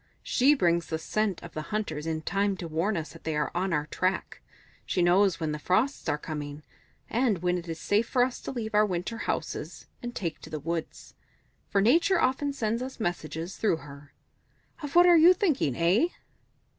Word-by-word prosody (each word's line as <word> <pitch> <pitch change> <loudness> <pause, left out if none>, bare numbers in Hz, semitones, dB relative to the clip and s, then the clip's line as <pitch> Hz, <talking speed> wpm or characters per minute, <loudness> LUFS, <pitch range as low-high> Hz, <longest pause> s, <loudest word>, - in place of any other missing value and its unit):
She 275 +4 +4
brings 170 -8 +1
the 160 - -2
scent 205 +3 -1
of 170 - -10
the 155 - -3
hunters 165 -8 -3
in 160 -1 -2
time 200 +2 0
to 175 - -5
warn 170 +6 0
us 160 -1 -5
that - - -14
they 160 -1 -2
are 150 0 0
on 185 +2 -1
our 150 -3 0
track; 185 +4 -2 0.4
she 180 - 0
knows 180 0 +4
when 160 -2 -1
the 150 - -4
frosts 220 - 0
are 145 - +1
coming, 150 -1 -6 0.4
and 225 -7 0
when 180 0 +2
it 175 -1 -5
is 165 0 -4
safe 210 +6 +1
for 250 -2 +3
us 250 0 -2
to - - -5
leave 225 -4 -4
our 210 0 +5
winter 200 +3 -2
houses - - -4 0.2
and 240 0 -6
take 165 -5 -3
to - - -11
the 155 - -4
woods. 165 +2 -5 0.6
For 200 - +2
Nature 335 - +4
often 280 +2 +1
sends 230 -3 -1
us 260 0 -6
messages 170 -2 -3
through 210 -7 +1
her. 140 0 -13 0.7
Of 290 0 -6
what 350 0 +8
are 350 -1 +7
you 350 +3 +8
thinking? 295 - +1
Eh?" 180 - +3
185 Hz, 200 wpm, -28 LUFS, 160-235 Hz, 0.7 s, what